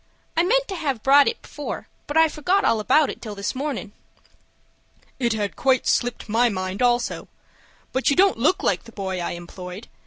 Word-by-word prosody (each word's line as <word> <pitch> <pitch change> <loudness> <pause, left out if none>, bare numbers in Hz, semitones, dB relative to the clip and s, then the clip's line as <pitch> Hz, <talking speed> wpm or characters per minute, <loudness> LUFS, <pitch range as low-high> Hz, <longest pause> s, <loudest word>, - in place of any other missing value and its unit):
I 330 - +4
meant - - +2
to 390 - -4
have 275 -9 -2
brought 280 +1 +6
it 460 - -2
before, 295 - -6 0.2
but 290 - -1
I 320 0 +7
forgot 360 +6 0
all 225 - +3
about 295 +7 +3
it - - -11
till 215 -3 -7
this 200 0 -3
mornin'." 265 -6 -4 1.3
"It 235 -3 +1
had 210 -2 -2
quite 260 -1 +2
slipped 245 -1 0
my 235 +3 +3
mind 185 0 -4
also. 245 -1 +1 0.7
But 260 - +2
you 280 - +3
don't 385 -7 +4
look 310 +10 +2
like 185 - 0
the 230 - -12
boy 190 -3 -4
I 175 - -3
employed. 180 +3 -9
245 Hz, 190 wpm, -23 LUFS, 205-300 Hz, 1.3 s, I